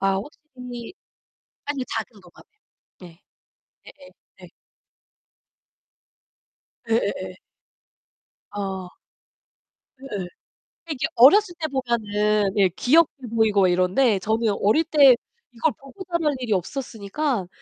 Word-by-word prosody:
아 195 0 +2
확실히 250 - -9 0.7
아니요 285 -3 -3
작은 220 -1 -5
도마뱀. 180 -2 -19 0.5
네. 175 -1 -14 0.6
예예. - - -15 0.3
네. - - -12 2.4
예예예. 195 -5 -1 1.2
아. 190 -2 -5 1.1
네. 210 -9 -6 0.6
이게 300 +1 -1
어렸을 350 - +6
때 315 - -2
보면은 210 -6 0
예 195 -2 +4
귀엽게 270 - +2
보이고 215 -3 +3
막 185 - +5
이런데 190 +5 +2
저는 220 +3 0
어릴 215 +11 +3
때 290 -5 +6 0.4
이걸 245 +6 0
보고 275 +8 -11
자랄 335 -5 -1
일이 240 -4 -1
없었으니까 220 - -3
230 Hz, 200 characters per minute, -23 LUFS, 195-275 Hz, 2.4 s, 어렸을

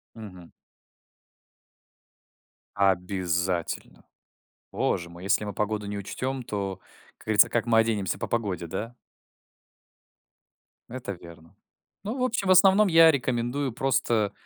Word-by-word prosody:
Мгм. 95 -6 -11 2.2
Обязательно. 90 -3 -1 0.7
Боже 85 - -1
мой, 85 +1 -12
если 100 +2 +1
мы 105 - -5
погоду 105 +1 -2
не 100 0 -4
учтём, 130 +6 -4
то, 100 -4 -4 0.4
как - - -19
говорится, 110 -1 +5
как 120 - -1
мы 115 -1 +3
оденемся 110 -5 0
по - - -3
погоде, 100 -7 -2
да? 105 +8 -5 2.0
Это 120 -4 -6
верно. 85 -1 -14 0.5
Ну, 220 +6 -4
в - - -4
общем, 225 -5 -1
в - - +4
основном 195 +2 +6
я 165 -1 +7
рекомендую 125 0 -2
просто 120 -5 0
105 Hz, 115 wpm, -26 LUFS, 95-130 Hz, 2.2 s, я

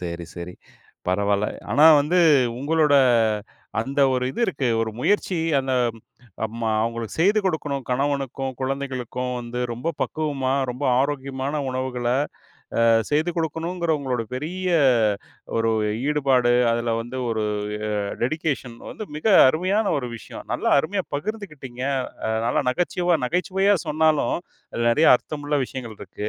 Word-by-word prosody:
சரி, 85 -1 -5
சரி 90 +1 -7 0.5
பரவால்ல. 100 +2 +1 0.2
ஆனா 145 +8 +6
வந்து, 165 +6 +1 0.4
உங்களோட 150 +1 +2 0.9
அந்த 135 +5 -2
ஒரு 125 0 0
இது 185 - -6
இருக்கு 135 - -1
ஒரு 115 -1 -1
முயற்சி, 195 +5 +1 0.2
அந்த 135 -1 -2 0.2
ம் - - -14 0.4
அப்றமா 115 +1 -2
அவங்களுக்கு 115 -1 -3
செய்து 200 +5 +4
கொடுக்கணும், 150 -6 -1
கணவனுக்கும், 135 0 -1
குழந்தைகளுக்கும் 130 -2 -3
வந்து 120 0 -5
ரொம்ப 120 +8 -4
பக்குவமா 140 -4 -1 0.2
ரொம்ப 125 +4 -5 0.2
ஆரோக்கியமான 140 +1 -2
உணவுகள 130 -1 -3 0.8
அ - - +5 0.3
செய்து 155 +4 +1
குடுக்கணும்ங்கிற 165 +1 -1
உங்களுடைய 125 -5 -3
பெரிய 180 +7 -3 0.9
ஒரு 115 0 +2 0.4
ஈடுபாடு, 135 -5 +3 0.2
அதில 115 0 0
வந்து 120 +3 -6
ஒரு 110 -1 -1 0.6
அ - - -3 0.2
டெடிகேஷன் 130 -3 -2
வந்து 215 - -7
மிக 155 - -5 0.2
அருமையான 185 +9 +1
ஒரு 125 -3 -4
விஷயம் - - -10
நல்லா - - 0
அருமையா 190 +5 -2
பகிர்ந்துக்கிட்டீங்க. 150 - -6 0.4
அ - - -1 0.2
நல்லா 120 - +1
நகச்சுவ 175 +3 +1
நகைச்சுவையா 195 +5 +2
சொன்னாலும் 155 -1 +2 0.4
அதில 120 - -1
நெறைய 155 +7 +4
அர்த்தமுள்ள 145 +2 -3
விஷயங்கள் 120 -5 -7
இருக்கு. 105 - -6
135 Hz, 130 wpm, -23 LUFS, 120-160 Hz, 0.9 s, ஆனா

